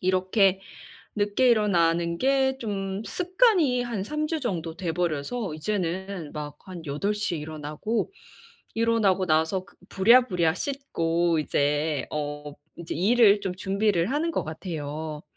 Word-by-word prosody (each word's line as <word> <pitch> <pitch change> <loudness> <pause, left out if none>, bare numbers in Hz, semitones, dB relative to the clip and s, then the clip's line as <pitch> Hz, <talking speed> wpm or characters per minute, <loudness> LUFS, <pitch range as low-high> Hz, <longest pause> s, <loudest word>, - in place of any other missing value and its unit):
이렇게 185 +1 +2 0.6
늦게 205 +5 +2
일어나는 170 -6 +2
게 265 0 +2
좀 195 -3 -3
습관이 360 - +2
한 230 -5 -3
3 300 +5 -2
주 320 -1 -2
정도 170 -9 -3
돼 175 -3 -2
버려서 175 +3 -2
이제는 185 -1 -3
막 150 -1 -6
한 175 -3 -8
8 150 +9 -1
시에 210 -6 -2
일어나고 155 - -3 0.6
일어나고 225 -5 +2
나서 160 +4 +1
그 200 - -22
부랴부랴 190 -6 +4
씻고 170 - -1
이제 145 -1 0
어 145 -1 -4 0.2
이제 170 -1 -6
일을 205 +3 +5
좀 185 -2 -3
준비를 195 0 0
하는 315 +4 0
것 - - -2
같아요. 155 -2 -5
185 Hz, 245 characters per minute, -26 LUFS, 160-225 Hz, 0.6 s, 일을